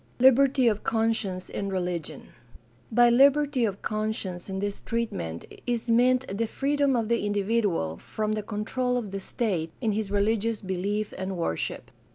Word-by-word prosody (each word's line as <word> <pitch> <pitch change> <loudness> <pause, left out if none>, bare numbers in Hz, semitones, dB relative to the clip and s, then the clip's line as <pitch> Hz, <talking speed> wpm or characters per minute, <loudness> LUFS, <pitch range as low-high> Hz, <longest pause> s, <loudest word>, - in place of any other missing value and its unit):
Liberty 265 0 +5
of 215 -2 +1
conscience 220 -5 0
in 200 - -4
religion. 175 -5 -3 0.3
— - - -34 0.3
By 240 +1 +5
liberty 275 0 +4
of 200 -2 -4
conscience 215 -4 -3
in 190 - -3
this 200 +1 -3
treatment 90 - -3 0.2
is 235 -1 0
meant 255 +2 +4
the 225 +2 0
freedom 280 +2 +1
of 230 -2 0
the 235 -1 +1
individual 205 - 0
from 215 - -3
the 215 0 -1
control 225 +4 -1
of 215 -5 -4
the 195 - -3
state 185 -6 -2
in 225 -4 0
his 210 -1 -2
religious 215 +2 +1
belief 200 +3 -2
and 190 0 -3
worship. 80 - -3
215 Hz, 160 wpm, -27 LUFS, 195-240 Hz, 0.3 s, Liberty